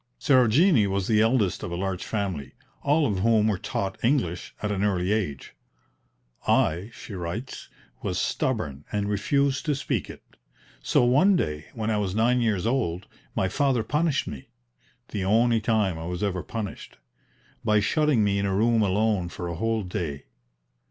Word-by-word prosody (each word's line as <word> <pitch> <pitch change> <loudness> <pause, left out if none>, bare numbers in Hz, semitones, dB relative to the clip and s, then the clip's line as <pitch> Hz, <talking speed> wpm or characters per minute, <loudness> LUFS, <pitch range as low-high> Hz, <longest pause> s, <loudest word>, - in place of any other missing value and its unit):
Sarojini 130 - +4
was 100 -1 -1
the 110 -2 +3
eldest 110 -5 +2
of - - -4
a - - -2
large 95 0 -3
family, 90 - -3 0.3
all 150 +2 +2
of 100 -7 0
whom 110 +1 +3
were 100 -4 0
taught 95 -1 -4
English 115 - 0
at 105 - 0
an 100 -1 -1
early 95 -2 +1
age. 95 -11 -2 0.9
"I," 90 +7 +2
she 115 - -10
writes, 95 +8 -6 0.3
"was - - -2
stubborn 70 -1 -2
and 105 -1 -1
refused 135 +7 +1
to 150 - +2
speak 140 - -2
it. - - -10 0.6
So - - +2
one 145 +11 +5
day 75 - -2
when 110 -1 -1
I 110 - +1
was 100 -2 -2
nine 120 +3 +3
years 105 -5 0
old 110 -8 -1 0.3
my 95 - +1
father 130 +3 +1
punished 150 +3 0
me 65 - -7 0.6
the 100 - -3
only 115 +3 +3
time 105 -6 +1
I 80 - -5
was 90 +2 -3
ever 95 -3 -1
punished 110 -1 -6 0.7
by 105 0 +3
shutting 145 +2 +2
me 100 -1 +1
in 100 - 0
a 95 - 0
room 115 +2 +3
alone 100 -2 +1
for 90 0 -6
a 85 - -4
whole 115 +4 -1
day. 80 -6 -4
105 Hz, 170 wpm, -26 LUFS, 95-120 Hz, 0.9 s, one